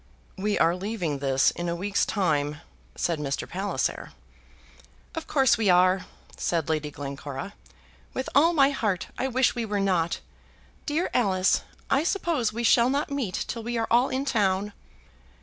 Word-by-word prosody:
"We 205 +2 -1
are 170 +1 +3
leaving 180 -7 -3
this 135 -1 +3
in 175 0 -4
a 170 - -1
week's 200 +3 0
time," 150 -6 0 0.3
said 170 -3 -1
Mr. 140 -2 -3
Palliser. 195 +3 -2 1.0
"Of 325 - -5
course 265 -5 +3
we 215 -3 +2
are," 185 +1 +4 0.3
said 165 -3 -1
Lady 155 -1 -1
Glencora. 140 +4 -6 0.6
"With 260 - -4
all 315 +5 +5
my 280 -4 +4
heart 210 -9 -1
I 265 - +1
wish 260 0 +2
we 240 - -2
were 210 -2 -2
not. 180 -4 +1 0.7
Dear 315 +4 0
Alice! 190 -6 +2 0.3
I 275 - +3
suppose 330 - 0
we 235 +2 -4
shall 235 +1 +5
not 285 +2 -1
meet 255 -10 -2
till 230 - -4
we 235 +1 -3
are 225 - +1
all 240 +3 +4
in 265 +2 -2
town." 205 -5 +1
205 Hz, 160 wpm, -26 LUFS, 170-255 Hz, 1.0 s, all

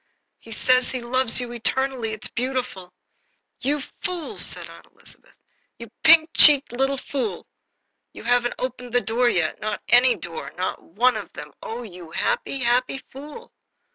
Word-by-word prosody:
He 225 - -15
says 255 +3 +2
he 255 - -3
loves 255 +1 +1
you 245 -1 -5
eternally. 245 0 -1
It's 215 -1 -3
beautiful!" 245 -7 -4 0.7
"You 285 +2 -1 0.2
fool!" 355 -3 -3
said - - -3
Aunt - - -15
Elizabeth. - - -13 0.4
"You 235 -2 -11
pink 320 0 +7
cheeked 290 -4 +7
little 270 +3 0
fool! 240 -9 -4 0.7
You - - -11
haven't 245 0 +1
opened 250 -1 -5
the 245 - +3
door 240 +2 +1
yet 170 -8 -1
not 215 -1 -4
any 245 +1 +5
door, 170 -3 -7
not 185 - -3
one 240 +8 +1
of 210 - -8
them 150 0 -10
oh, 235 +2 -6
you 180 -6 -11
happy, 170 - -2
happy 255 +2 0
fool!" 300 - -11
245 Hz, 155 wpm, -23 LUFS, 225-265 Hz, 0.7 s, pink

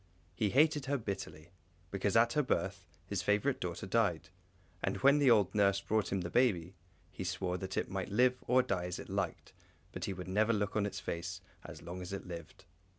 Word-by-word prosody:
He 105 +3 0
hated 150 +2 +3
her 140 +1 +1
bitterly, 90 - -6 0.4
because 100 +1 0
at 115 +1 +5
her 150 - +3
birth 95 -8 -2 0.2
his 100 - -2
favourite 105 +7 +1
daughter 90 +3 -4
died; 95 -5 +1 0.5
and 95 0 -1
when 140 +2 +6
the 140 -3 +5
old 105 -5 +4
nurse 100 -2 +3
brought 110 +1 0
him 95 -1 0
the 85 - -5
baby, 95 -9 +2 0.4
he - - -6
swore, 90 0 -2
that 95 0 -5
it - - -1
might 95 -1 -3
live 125 +4 +2
or 130 +1 +5
die 95 -8 -1
as 90 0 -4
it - - -9
liked, - - -3 0.4
but - - -4
he 100 - -3
would 90 -1 -7
never 105 +4 +2
look 105 -1 -1
on 105 -1 +2
its 95 -2 -5
face 90 +1 -4 0.2
as - - -10
long 90 +2 -6
as 90 +2 -6
it 100 - -5
lived. 85 +2 -9
100 Hz, 210 wpm, -33 LUFS, 90-115 Hz, 0.5 s, when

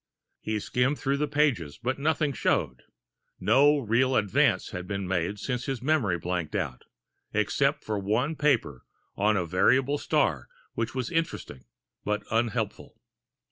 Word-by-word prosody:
He 110 0 -2
skimmed, 125 +7 0
through 140 +1 0
the 150 +1 0
pages, 130 - 0
but 130 +4 -2
nothing 150 -1 +1
showed. 65 - 0 0.6
No 145 +2 +5
real 130 +1 +1
advance 100 -3 +2
had 90 0 -6
been 100 -1 -3
made 90 +2 -1
since 125 +3 -3
his 135 -3 -3
memory 130 - +2
blanked 90 +2 -3
out, 75 -11 -3 0.5
except 135 +7 +1
for 105 -2 -2
one 115 +10 0
paper 125 - +1 0.3
on 105 +1 +2
variable 130 - +2
stars - - 0 0.3
which 115 +2 -3
was 130 -2 -2
interesting, 165 - -3 0.4
but 105 0 -1
unhelpful. 115 -1 -2
115 Hz, 140 wpm, -27 LUFS, 100-140 Hz, 0.6 s, No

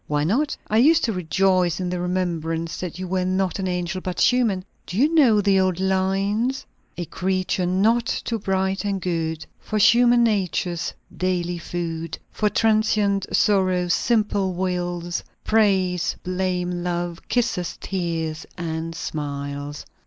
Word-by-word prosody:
"Why 145 -1 0
not? 250 - +1
I 215 - +2
used 320 +6 +5
to 225 - +1
rejoice 180 0 +1
in 185 - -2
the 180 - -2
remembrance 170 -2 -2
that 180 -2 -5
you 185 0 -5
were 185 0 0
not 185 0 0
an 190 - -1
angel 180 0 -2
but 185 -1 -4
human. 225 -7 +2 0.2
Do 180 - -5
you 295 +7 +3
know 245 -10 +5
the 195 -1 +3
old 185 -2 +1
lines? 195 +6 0 0.3
'A 175 - -3
creature 185 +1 -1
not 220 +6 +2
too 230 -2 -2
bright 190 0 0
and 200 -1 -1
good 165 -3 -2
For 215 - -3
human 240 +3 +5
nature's 180 -5 0 0.2
daily 175 -1 -1
food; 165 -1 -4
For 210 - +1
transient 215 -3 +2
sorrows, 185 -4 +2
simple 210 -5 +1
wiles, 175 -1 -2 0.2
Praise, 190 -5 +2
blame, 180 -1 -1
love, 175 -1 -2
kisses, 225 -8 0
tears 165 -4 -3
and 165 -1 -4
smiles.' 145 -1 -5
185 Hz, 140 wpm, -23 LUFS, 175-205 Hz, 0.3 s, used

